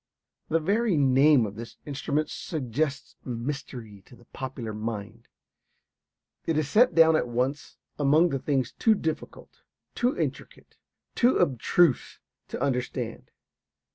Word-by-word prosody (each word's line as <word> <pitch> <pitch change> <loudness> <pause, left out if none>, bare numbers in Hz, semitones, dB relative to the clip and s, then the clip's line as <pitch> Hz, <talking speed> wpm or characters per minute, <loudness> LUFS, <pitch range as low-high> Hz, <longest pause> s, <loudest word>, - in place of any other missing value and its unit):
The 165 - +2
very 200 +3 +1
name 135 -1 +5
of 100 - -6
this 115 +2 -9
instrument 145 +1 -2
suggests 140 -1 -3
mystery 120 -4 -6
to - - -15
the 120 - -20
popular 125 -3 -6
mind. 110 +1 -6 1.2
It 160 - +1
is 155 -2 0
set 240 - +4
down 160 -1 +6
at 155 - +1
once 125 +4 -2 0.2
among 150 +5 +4
the 135 -3 -2
things 130 -2 -1
too 220 -1 +3
difficult, 160 -5 -5 0.3
too 245 +2 0
intricate, - - -5 0.4
too 245 +1 +3
abstruse 170 +2 +2 0.3
to - - -6
understand. 125 -3 -3
140 Hz, 125 wpm, -27 LUFS, 120-160 Hz, 1.2 s, down